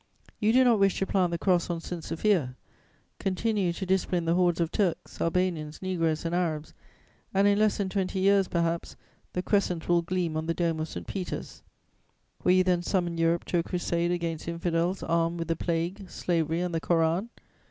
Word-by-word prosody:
You 215 0 +3
do 255 +2 +6
not 235 -4 +4
wish 195 -1 +3
to 195 - 0
plant 185 -2 +1
the 170 - -2
Cross 180 -1 +1
on 170 -1 -1
St. 170 0 -6
Sophia: 165 -8 0 0.6
continue 195 -1 0
to 190 - -5
discipline 180 -2 0
the 165 - +2
hordes 175 -1 +2
of 165 0 0
Turks, 185 -5 -1
Albanians, 165 -3 -1
Negroes 165 -4 -1
and 165 - -1
Arabs, 160 -4 -1 0.6
and, 195 +1 +5
in 205 0 +3
less 215 -1 +3
than 200 - -1
twenty 190 0 -2
years, 195 0 +4
perhaps, 170 -1 -1 0.4
the 180 - -2
Crescent 185 -5 0
will 175 0 +4
gleam 175 -2 -2
on 160 +1 -2
the 165 - 0
dome 165 -2 0
of 155 - -2
St. - - -7
Peter's. 190 -3 -5 0.8
Will 180 - +5
you 185 0 +5
then 180 -1 +2
summon 175 -2 0
Europe 165 +1 +2
to 175 - +1
a - - +3
crusade 175 -1 -1
against 170 -3 -2
infidels 170 +2 -1
armed 165 +1 +1
with 165 -1 -4
the 165 - +2
plague, 175 +4 -2
slavery 165 -1 -1
and 180 -1 -2
the 165 - -1
Koran? 170 +6 +1
175 Hz, 195 wpm, -28 LUFS, 165-185 Hz, 0.8 s, do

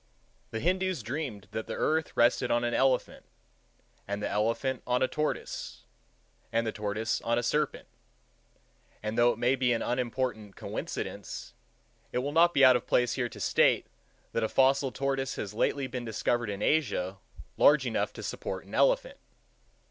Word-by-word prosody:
The 115 - -4
Hindoos 185 -2 0
dreamed 120 -5 -4
that 110 - -4
the - - -4
earth 160 0 0
rested 120 +1 +3
on 120 0 +2
an 120 0 0
elephant, 130 -1 +1 0.8
and 100 +1 -2
the - - 0
elephant 115 +5 0
on 125 +1 +2
a - - +3
tortoise, 150 +2 -3 0.7
and 115 0 +1
the 110 - -1
tortoise 105 +2 -2
on 115 0 0
a 120 - 0
serpent; 150 +4 -1 1.2
and 110 +1 -2
though 120 +1 +5
it - - -11
may 125 +3 +2
be 125 -2 +2
an 115 - -1
unimportant 120 -4 -2
coincidence, - - -5 0.6
it - - -2
will 135 +3 -1
not 170 +3 +5
be 140 -5 +6
out 130 -1 +8
of 125 - -2
place 125 0 +2
here 125 -2 -1
to - - -11
state, - - +3 0.5
that 115 - -1
a 110 - 0
fossil 135 0 +3
tortoise 135 0 -1
has 100 -1 -5
lately 135 +5 0
been 125 -1 -5
discovered 115 0 -1
in 100 0 -4
Asia 100 -11 0 0.4
large 145 -3 +5
enough 120 - -1
to - - -8
support - - -5
an - - -14
elephant. - - +2
125 Hz, 170 wpm, -29 LUFS, 115-135 Hz, 1.2 s, out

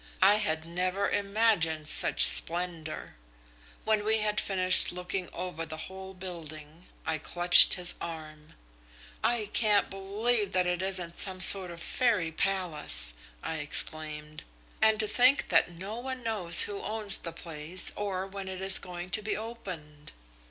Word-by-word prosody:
I 205 +2 +5
had 160 -7 -3
never 185 +4 -3
imagined 200 -7 -1
such - - +5
splendour. 165 - +1 0.7
When 215 -1 0
we 220 +1 0
had 210 -1 -2
finished 185 -1 +4
looking 180 +1 -6
over 180 -2 -7
the 155 -1 -7
whole 190 +3 -10
building, 165 -3 -10 0.2
I 160 0 -3
clutched 175 +3 +5
his 180 -1 0
arm. 155 -2 -10 0.7
"'I 220 -3 -1
can't 210 -3 +1
believe 205 +2 -2
that 185 -1 0
it 180 0 -3
isn't 185 -3 -5
some 190 -1 -1
sort 185 0 +9
of 170 -1 -10
fairy 220 -10 -1
palace!' 155 - -2 0.3
I 160 - -5
exclaimed. 150 0 -3 0.4
And 220 0 +2
to 215 - +2
think 255 +5 +2
that 165 0 +2
no 190 +6 -8
one 260 0 -7
knows 190 -7 +4
who 205 -1 -6
owns 210 -1 -2
the 170 - -7
place 165 +1 -1
or 195 -2 -4
when 195 0 -9
it 190 -1 -8
is 190 0 +4
going 180 0 -9
to 215 - +1
be 210 0 -3
opened!' 180 -10 -10
185 Hz, 150 wpm, -27 LUFS, 165-205 Hz, 0.7 s, sort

